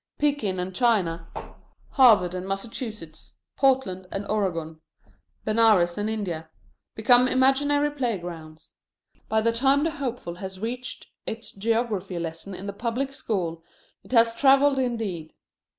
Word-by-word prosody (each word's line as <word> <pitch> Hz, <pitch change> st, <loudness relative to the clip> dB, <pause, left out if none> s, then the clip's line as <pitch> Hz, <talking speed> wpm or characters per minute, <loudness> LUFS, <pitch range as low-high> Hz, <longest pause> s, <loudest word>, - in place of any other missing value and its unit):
Pekin 280 Hz, -11 st, 0 dB
and 180 Hz, +1 st, -3 dB
China, 185 Hz, -8 st, +1 dB, 0.6 s
Harvard 215 Hz, -, +5 dB
and 185 Hz, +1 st, -5 dB
Massachusetts, 200 Hz, -3 st, -6 dB, 0.2 s
Portland 255 Hz, -9 st, +1 dB
and 195 Hz, +1 st, -3 dB
Oregon, 165 Hz, -7 st, -2 dB, 0.6 s
Benares 215 Hz, -6 st, +4 dB
and 210 Hz, +1 st, -2 dB
India, 175 Hz, -7 st, -4 dB, 0.5 s
become 245 Hz, +3 st, +5 dB
imaginary 285 Hz, +3 st, +2 dB
playgrounds. 175 Hz, -, -5 dB, 0.6 s
By 220 Hz, 0 st, +2 dB
the 230 Hz, +1 st, +2 dB
time 270 Hz, +5 st, +2 dB
the 325 Hz, -, +1 dB
hopeful 245 Hz, -, -5 dB
has 190 Hz, 0 st, -7 dB
reached 245 Hz, +3 st, -5 dB, 0.2 s
its 225 Hz, +1 st, -5 dB
geography 210 Hz, -3 st, -1 dB
lesson 170 Hz, +3 st, -5 dB
in 190 Hz, -, -7 dB
the 200 Hz, -, -4 dB
public 245 Hz, +6 st, -2 dB
school 175 Hz, -10 st, -3 dB, 0.4 s
it -, -, -17 dB
has 230 Hz, -2 st, +5 dB
travelled 275 Hz, +1 st, +4 dB
indeed. 220 Hz, -11 st, -3 dB
220 Hz, 125 wpm, -25 LUFS, 180-250 Hz, 0.6 s, Harvard